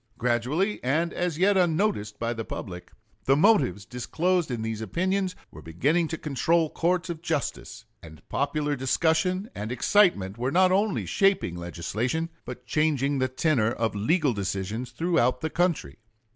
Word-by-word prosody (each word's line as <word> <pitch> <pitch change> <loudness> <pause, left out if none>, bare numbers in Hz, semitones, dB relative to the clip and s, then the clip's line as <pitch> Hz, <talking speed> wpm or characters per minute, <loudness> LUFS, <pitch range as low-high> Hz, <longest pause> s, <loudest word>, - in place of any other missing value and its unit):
Gradually, 125 - 0
and 160 +7 0
as 175 -3 -2
yet 195 +3 +3
unnoticed 170 - +1
by 115 +1 -2
the 115 -1 -4
public, 90 -4 -7 0.3
the 135 - +4
motives 145 - +3
disclosed 165 - -1
in 120 -3 -3
these 110 -1 -3
opinions 185 - -1 0.2
were 75 - -11
beginning 140 - 0
to 160 - -4
control 160 +3 +1
courts 180 +1 0
of 165 -2 -7
justice, 160 -6 -3 0.2
and 80 -2 -14
popular 145 +1 -1
discussion 165 - 0
and 105 +3 -5
excitement 125 - +2
were 125 +2 0
not 185 +3 +4
only 200 +2 +1
shaping 195 - +1
legislation, 105 - -3 0.2
but - - -8
changing 145 -3 +1
the 130 - +2
tenor 130 -3 +1
of 115 -2 -1
legal 140 - +1
decisions 100 +4 -3
throughout 145 -8 +1
the 160 - -2
country. 165 - -1
145 Hz, 150 wpm, -26 LUFS, 115-175 Hz, 0.3 s, the